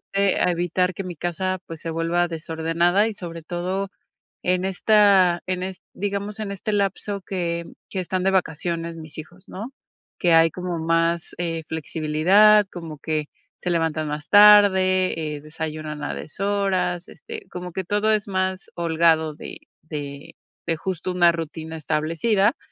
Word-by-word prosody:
ayude 200 -1 +2
a - - +3
evitar 175 +1 0
que 195 - -5
mi 180 -3 -7
casa, 185 +3 -2
pues, 165 -1 -8
se 165 - -4
vuelva 165 +2 +1
desordenada, 165 +4 +1
y 220 - -5
sobre 170 -4 -7
todo, 185 +4 -3 0.5
en 180 +1 +1
esta 190 -2 +4
en 185 0 -2
est 185 0 -6
digamos, 200 +1 -3
en 210 -2 -3
este 200 +2 -4
lapso 200 0 -1
que 170 -3 -3 0.2
que, 190 - -3
están 185 +1 -2
de 195 - +3
vacaciones 170 -1 -1
mis 155 -1 -11
hijos, 175 +4 -11
¿no?, 215 +7 -7 0.5
que 175 -2 +3
hay 165 0 +6
como 180 0 -4
más, 165 +1 +1
eh, 165 -2 -2
flexibilidad, 165 +7 +4
como 165 -4 -7
que 155 -1 -2 0.3
se 180 - -3
levantan 160 -2 0
más 150 0 -5
tarde, 185 -6 +5
eh, - - -9
desayunan 155 -1 -5
a - - -3
deshoras, 195 0 -1
este, 450 -2 -9
como 180 0 -6
que 190 +2 -3
todo 205 +3 +1
es 210 -1 +1
más 190 -1 -2
holgado 165 -2 +2
de - - -9 0.2
de 145 -2 -7 0.3
de, 165 - +2
justo, 185 +1 -3
una 175 -1 +5
rutina 160 -1 -5
establecida. 170 - +1
175 Hz, 155 wpm, -23 LUFS, 160-190 Hz, 0.5 s, hay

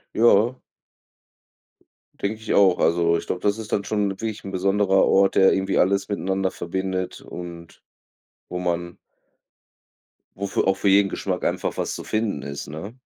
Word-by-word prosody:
Ja. 115 +2 +4 1.7
Denke 105 +2 -2
ich 110 - -2
auch. 95 -3 +5
Also 85 0 +3
ich - - -7
glaube, 90 - -3
das 100 +1 +1
ist 110 -2 -8
dann 100 - +1
schon 105 0 0
wirklich 110 +2 -5
'n 95 - -5
besonderer 95 +1 +2
Ort, 95 0 +3
der 95 - +6
irgendwie 95 0 0
alles 100 +1 +2
miteinander 95 -2 -1
verbindet 95 +1 -3
und 85 -1 -10 0.7
wo 90 - -3
man 85 -1 -3 1.4
wo 100 - -3
für - - 0
auch 95 - +3
für 100 +1 +1
jeden 100 +1 +5
Geschmack - - -3
einfach - - -1
was - - -2
zu - - -7
finden 110 -9 -2
ist, 70 0 -6
ne? 95 +10 -8
95 Hz, 160 wpm, -23 LUFS, 90-100 Hz, 1.7 s, der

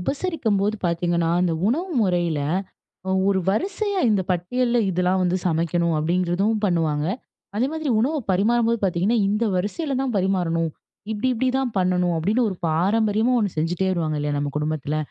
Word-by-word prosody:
உபசரிக்கும்போது 220 - -1
பார்த்தீங்கன்னா, 170 0 0
அந்த 180 -2 +1
உணவு 330 - 0
முறைல, 175 -6 +1 0.7
அ - - 0 0.2
ஒரு 190 -1 +2
வரிசையா 390 - 0
இந்த 200 -3 +2
பட்டியல்ல 240 +8 0
இதெல்லாம் 180 +1 +1
வந்து 180 0 +1
சமைக்கணும் 170 0 +1
அப்டீங்கிறதும் 180 +6 +1
பண்ணுவாங்க. 160 -5 +1 0.5
அதேமாதிரி, 290 +5 -1
உணவ 285 +7 +1 0.2
பரிமாறும்போது 230 +4 +2
பார்த்தீங்கன்னா, 190 +5 +1
இந்த 210 +3 +1
வரிசைல 260 - -2
தா 270 - 0
பரிமாறணும். 175 -4 0 0.4
இப்டி, 220 +4 -1
இப்டி, 255 +3 0
தா 270 - +1 0.2
பண்ணணும். 180 -1 +1
அப்டீன்னு 215 +9 +1
ஒரு 190 - -4
பாரம்பரியமா, 210 +7 +2
ஒன்னு 205 -4 -1
செஞ்சுட்டே 175 +4 0
வருவாங்க 160 -4 -1
இல்லையா? 145 0 -1
நம்ம 145 0 -2
குடும்பத்துல. 150 -1 -2
190 Hz, 145 wpm, -23 LUFS, 170-230 Hz, 0.7 s, ஒரு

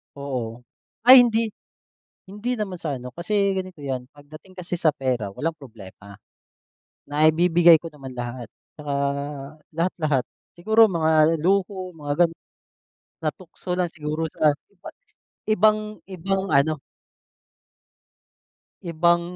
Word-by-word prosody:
Oo. 125 -4 -5 0.4
Ay 255 +1 +10
hindi. 225 -2 +1 0.8
Hindi 210 +6 -3
naman 195 -3 -3
sa 150 -5 -3
ano, 125 - -8
kasi 170 +5 -5 0.2
ganito 185 -4 -5
'yan, 130 -3 -3
pagdating 155 +6 -15
kasi 180 0 -4
sa 155 -2 +3
pera 125 -8 -2
walang 160 +6 -3
problema. 100 -6 -13 1.0
Naibibigay 165 +3 +5
ko 165 - -7
naman 135 -3 -10
lahat 120 0 -5 0.3
tsaka 145 -1 -5 0.8
lahat, 170 +3 0
lahat. 145 -5 +1 0.3
Siguro 220 +5 +5
mga 160 -2 +3
luho, 190 0 0
mga 145 -3 -5
gano'n. 165 0 -4 0.8
Natukso 175 +3 -5
lang 180 -2 0
siguro 155 0 -3
sa 150 -2 +3 0.2
iba 180 - -12 0.6
ibang 215 0 +2
ibang 195 +1 -3
ano 140 +1 +2 2.0
Ibang 170 +1 +2
165 Hz, 115 wpm, -23 LUFS, 145-185 Hz, 2.0 s, Ay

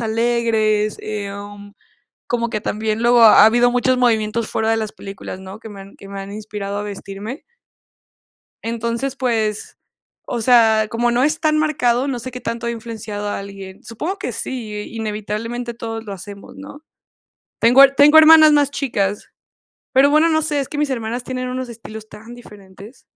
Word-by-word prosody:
alegres. 220 -2 0
Em, 205 0 -7 0.5
como 235 -1 -1
que 215 - -2
también 215 +1 -2
luego, 240 0 +5
ha 215 -2 +8
habido 240 +2 +4
muchos 250 +1 +1
movimientos 225 -2 +1
fuera 220 0 -1
de 225 - +1
las 215 -1 -4
películas, 195 -1 -9
¿no?, 190 +3 -10
que 225 - -10
me 200 -1 -10
han 195 +1 -16
que 195 - -13
me 200 0 -7
han 195 +1 -8
inspirado 205 -1 -5
a - - -3
vestirme. 205 - -7 1.2
Entonces, 235 +4 -3
pues, 220 -5 -2 0.5
o 240 - -3
sea, 220 -3 +4
como 240 +1 0
no 240 +2 +1
es 305 +2 +1
tan 310 -1 +2
marcado, 265 -4 +1
no 255 -3 -2
sé 255 +2 -7
qué 250 0 -8
tanto 230 +1 -4
he - - 0
influenciado 220 -3 -6
a - - -3
alguien. 195 -1 -10
Supongo 320 - -5
que - - -4
sí, 235 -5 -5
e 210 - -5
inevitablemente 225 +2 -5
todos 225 -1 -6
lo 205 - -7
hacemos, 200 +6 -10
¿no? 285 +2 -12 0.8
Tengo 245 +4 +7
tengo 295 +3 +7
hermanas 315 0 +8
más 290 -1 +3
chicas, 205 -8 -2 0.6
pero, 275 +2 +5
bueno, 310 +2 +4
no 315 -1 +1
sé, 295 -2 -1
es 270 - -4
que 295 - -6
mis 295 -2 0
hermanas 240 0 -3
tienen 255 -1 -4
unos 255 0 -4
estilos 220 -1 -10
tan 225 +3 -12
diferentes. 205 0 -14
230 Hz, 175 wpm, -19 LUFS, 210-250 Hz, 1.2 s, ha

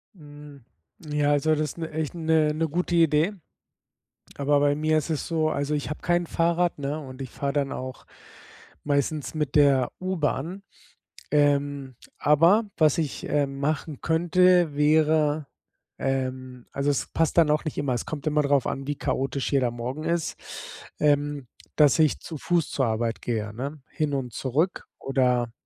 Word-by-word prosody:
Hm. 145 -4 -13 0.4
Ja, 150 -1 +1
also, 145 +2 +2
das 150 0 -3
'ne 165 -1 -4
echt 155 +1 -3
'ne 160 -2 +2
'ne 160 +1 0
gute 175 +3 -1
Idee. 165 +3 +3 1.0
Aber 145 +1 +2
bei 145 0 +3
mir 155 +1 +1
ist 155 - -2
es 155 -3 -2
so, 160 -2 +1
also, 145 0 -2
ich 145 - -3
habe 150 - -6
kein 175 0 +1
Fahrrad, 170 0 0
ne? 145 +2 -3
Und 130 -2 -9
ich 130 - -5
fahre 140 +3 -3
dann 140 -2 0
auch 130 0 -6 0.8
meistens 145 +1 -1
mit 150 -2 -2
der 140 -4 +4
U-Bahn. 180 0 -2 0.7
Ähm, 145 -2 +1 0.2
aber 165 +9 +4
was 155 -2 +3
ich, 155 -4 -2
ähm, 140 -2 0
machen 150 0 -2
könnte, 175 0 +3
wäre 150 0 +3 0.5
ähm, 130 -2 -3
also, 140 +1 0
es 140 - 0
passt 165 +1 +1
dann 165 -2 +6
auch 150 0 +1
nicht 155 - -4
immer, 140 -3 0
es 120 - -3
kommt 150 -2 -6
immer 150 0 +2
darauf 140 -2 +2
an, 135 0 -3
wie 145 - -1
chaotisch 135 +1 -2
jeder 130 -3 +2
Morgen 120 +5 -5
ist, 170 -1 -1 0.6
ähm, 145 -2 +1 0.3
dass 150 -1 +5
ich 155 -2 +3
zu 160 - -7
Fuß 170 +1 0
zur 130 - 0
Arbeit 115 0 -2
gehe, 110 -3 -3
ne? 140 +6 -5
Hin 155 -3 -2
und 130 -3 -3
zurück 150 +8 -1
oder 125 -3 +1
145 Hz, 165 wpm, -25 LUFS, 135-155 Hz, 1.0 s, dann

